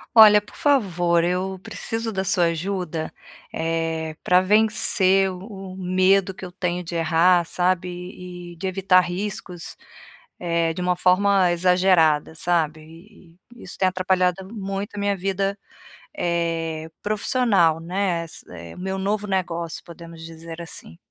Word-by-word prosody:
Olha, 210 -2 +9
por 210 - -17
favor, 175 - +2
eu 185 +2 -1
preciso 225 +2 -4
da 190 -1 -2
sua 185 -2 +2
ajuda, 170 -1 -3 0.4
eh, 160 -1 -2
pra 180 0 +4
vencer 195 -2 +3
o 190 0 -9
medo 190 +1 +2
que 190 - -12
eu 180 - -7
tenho 180 -1 -2
de 170 0 -6
errar, 170 +2 +3
sabe, 180 +1 0 0.6
e - - -12
de 175 +3 -7
evitar 185 -1 +3
riscos, 180 -1 -5 0.6
eh, 170 -1 0
de 180 - -5
uma 180 0 +1
forma 185 0 +3
exagerada, 175 -4 +3
sabe. 165 -2 0
E 170 +2 -17 0.2
e - - -12
isso 180 - -9
tem 190 - +2
atrapalhado 185 0 0
muito 195 -1 -5
a - - -4
minha 200 0 +1
vida, 195 +1 -1 0.6
eh, 165 - -2
profissional, 205 -6 +2
né, 180 0 -1
é - - -4
s 160 - -8 0.3
meu 190 +1 -3
novo 205 +2 -1
negócio, 170 -4 -2
podemos 170 -1 -12
dizer 165 +1 -9
assim. 145 - -9
180 Hz, 140 wpm, -23 LUFS, 170-195 Hz, 0.6 s, Olha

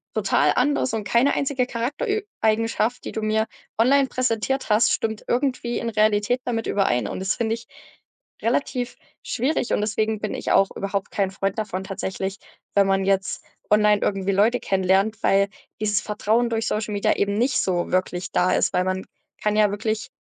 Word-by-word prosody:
total - - +2
anders 290 -4 +1
und 220 -1 -2
keine 235 +6 +3
einzige 270 -3 0
Charakterö 295 - -2 0.2
Eigenschaft, 225 +2 +1
die - - -4
du 220 - -3
mir 215 0 +1 0.3
online 270 +4 +4
präsentiert 255 +1 -1
hast, 215 +3 +4
stimmt 220 -1 -2
irgendwie 245 -2 0
in 235 - -2
Realität 215 +2 +2
damit 225 -2 -2
überein.“ 125 - +1
Und - - -5
das 190 +1 -1
finde 225 -1 -1
ich 230 - -12 0.7
relativ 250 +1 -1 0.3
schwierig. 255 +1 -1
Und - - +1
deswegen 215 0 0
bin 215 - -3
ich - - -3
auch 195 - +4
überhaupt 195 0 -3
kein 195 -2 0
Freund 195 0 -2
davon 195 -3 -3
tatsächlich, 190 0 -4 0.4
wenn 200 -1 +5
man 195 0 +2
jetzt 195 -3 0 0.3
online 210 -1 +4
irgendwie 195 -1 0
Leute 220 +6 +3
kennenlernt, 195 +3 +1
weil 200 +1 +3 0.3
dieses 210 -2 +1
Vertrauen 220 +3 0
durch 225 0 -1
Social 215 0 -2
Media 200 - +2
eben 200 0 0
nicht 255 +3 +2
so 175 -2 -1
wirklich 180 -1 -1
da 180 +1 +2
ist. - - +1
Weil 180 - +2
man 185 0 -2 0.4
kann 210 0 +1
ja 210 -2 +4
wirklich 215 +2 -2
215 Hz, 175 wpm, -23 LUFS, 195-235 Hz, 0.7 s, wenn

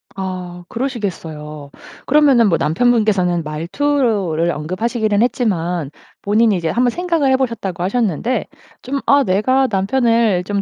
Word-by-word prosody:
아. 180 -2 -6
그러시겠어요. 160 - -5 0.3
그러면은 275 -6 +4
뭐 165 - +2
남편분께서는 195 -2 +1
말투를 175 - 0
언급하시기는 210 +7 -1
했지만 180 - -1 0.3
본인이 215 0 +2
이제 165 -2 -2
한번 245 +5 +2
생각을 335 -4 0
해 260 - +4
보셨다고 230 -9 -3
하셨는데 225 +3 -1 0.4
좀 275 +2 -3
'아 280 0 +4
내가 255 +7 +2
남편을 220 -1 +1
좀 200 +1 -2
205 Hz, 320 characters per minute, -18 LUFS, 175-245 Hz, 0.4 s, 그러면은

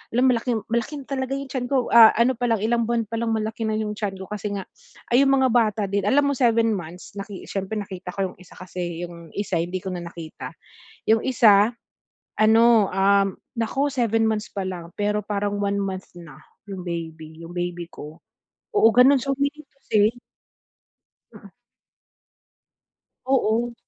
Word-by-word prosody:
alam 255 +1 +4
malaki 235 0 0 0.2
malaking 270 +5 -2
talaga 265 -1 -2
'yung 275 -1 -7
tiyan 245 -2 -3
ko. 260 -3 +1
Ah, 230 -2 +10
ano 240 +2 +4
palang 230 -4 0
ilang 235 0 +1
buwan 235 -1 +1
pa 230 - -3
lang 230 -1 -1
malaki 220 +2 -3
na 215 - 0
'yung 210 -1 -2
tiyan 200 -3 -3
ko - - -6
kasi 210 -1 -4
nga 195 - -4 0.5
ay 250 - +6
'yung 275 - +3
mga 260 -1 +3
bata 215 -3 +2
din 200 -1 0
alam 285 +6 +4
mo - - +2
7 230 -2 +3
months 175 +1 -8
naki 200 -1 -8
siyempre 195 +2 -4
nakita 185 -2 -7
ko 190 -2 -1
'yung - - -20
isa 180 - -16
kasi, 175 -2 -5
'yung 170 -1 -12
isa 200 -4 -1
hindi 180 +2 -3
ko 190 - -4
na 175 - -4
nakita. 165 -2 -9 0.6
'Yung 220 0 +4
isa, 220 -4 +5 0.7
ano, 225 -1 +5
um, 195 0 +2 0.2
naku 250 +5 0
7 225 -3 +1
months 215 -1 -2
pa 195 -2 -3
lang, 175 -2 -6
pero 210 0 0
parang 205 -1 -2
1 200 0 0
month 190 -1 -4
na, 170 -2 -12 0.3
'yung 190 -2 -6
baby 160 -1 -6
'yung 175 - -10
baby 175 -1 -3
ko. 150 +2 -10 0.6
Oo, 225 - +6
gano'n 260 +3 +6
siya, 275 +3 -1
meaning 285 +1 -2
to 275 - -37
say 210 -1 +4 1.3
Mm. - - -14 1.8
Oo. 240 -2 +1
210 Hz, 175 wpm, -23 LUFS, 190-235 Hz, 1.8 s, Ah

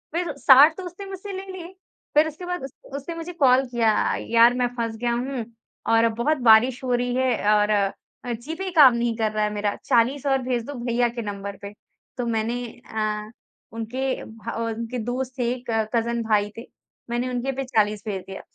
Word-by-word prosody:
फिर 345 -4 -1
60 285 +4 +7
तो 375 - -6
उसने 360 +3 -8
मुझसे 390 +1 -7
ले 380 +1 -6
लिए, 355 -2 -8 0.5
फिर 305 +1 +5
उसके 315 +4 -8
बाद 355 -4 -4
उस 270 - -6 0.2
उसने 310 +4 -5
मुझे 330 +2 -6
कॉल 265 -4 +4
किया, 230 -2 +3 0.4
"यार 235 +1 +6
मैं 250 -1 +1
फँस 230 -1 -2
गया 240 +1 -1
हूँ 250 -1 -3 0.5
और 225 0 +5
बहुत 285 +7 +1
बारिश 245 +4 +5
हो 250 -1 0
रही 245 0 0
है 245 -5 +2
और 210 0 +2
अ, 205 +4 -2
जीपे 320 +11 -5
काम 275 -5 +8
नहीं 235 -1 0
कर 220 -1 0
रहा 215 0 0
है 210 - +1
मेरा 205 0 -1
40 255 +5 +2
और 270 -1 +2
भेज 245 -2 -1
दो 285 - -6
भैया 240 0 +2
के 235 0 -5
नंबर 200 -2 -6
पे।" 200 0 -8 0.4
तो 245 - -2
मैंने 230 +2 -1 0.3
अ, 215 0 -2 0.4
उनके 255 +4 -2 0.4
और 230 0 -2
उनके 230 +2 -5
दोस्त 255 +1 -3
थे, 240 0 +1 0.2
कजिन 230 +1 0
भाई 210 -2 +1
थे, - - -5 0.5
मैंने 240 +2 -1
उनके 250 +2 -2
पे 270 - -2
40 215 -4 0
भेज 195 -2 -3
दिया। 190 - -7
240 Hz, 195 wpm, -24 LUFS, 225-270 Hz, 0.5 s, काम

